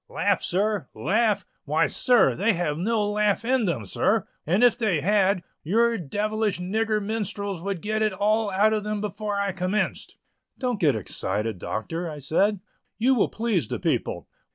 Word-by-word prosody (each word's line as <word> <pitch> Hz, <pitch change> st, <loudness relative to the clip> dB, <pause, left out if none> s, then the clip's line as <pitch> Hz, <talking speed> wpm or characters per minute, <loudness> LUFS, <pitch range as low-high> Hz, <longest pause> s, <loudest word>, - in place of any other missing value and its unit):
"Laugh, -, -, +1 dB
sir, 200 Hz, -4 st, 0 dB
laugh! 205 Hz, -, +1 dB, 0.2 s
why, 155 Hz, +2 st, +2 dB
sir, 250 Hz, -2 st, +3 dB
they 215 Hz, +3 st, +2 dB
have 170 Hz, -4 st, -1 dB
no 210 Hz, +5 st, 0 dB
laugh 210 Hz, +1 st, +1 dB
in 255 Hz, -2 st, +2 dB
them, 145 Hz, -, -2 dB
sir; -, -, +1 dB, 0.2 s
and 190 Hz, +9 st, +3 dB
if 245 Hz, -, +6 dB
they 215 Hz, -9 st, +1 dB
had, 195 Hz, 0 st, +2 dB, 0.2 s
your 230 Hz, +8 st, +2 dB
devilish 210 Hz, +3 st, -1 dB
nigger 215 Hz, +4 st, 0 dB
minstrels 200 Hz, -3 st, -3 dB
would 195 Hz, -2 st, -4 dB
get 215 Hz, +1 st, -1 dB
it 215 Hz, -1 st, +2 dB
all 210 Hz, +3 st, +1 dB
out 205 Hz, +3 st, +3 dB
of 215 Hz, -1 st, -1 dB
them 210 Hz, 0 st, -2 dB
before 210 Hz, 0 st, -3 dB
I 200 Hz, -1 st, 0 dB
commenced." 190 Hz, +3 st, -2 dB, 0.4 s
"Don't 250 Hz, -5 st, -2 dB
get 145 Hz, -7 st, +3 dB
excited, 105 Hz, 0 st, -2 dB
Doctor," 165 Hz, -, -4 dB
I 150 Hz, -, -7 dB
said; 185 Hz, +8 st, +1 dB, 0.4 s
"you 250 Hz, +4 st, +3 dB
will 235 Hz, -, +2 dB
please 215 Hz, -, -1 dB
the -, -, -3 dB
people." -, -, -2 dB
205 Hz, 170 wpm, -25 LUFS, 175-215 Hz, 0.4 s, if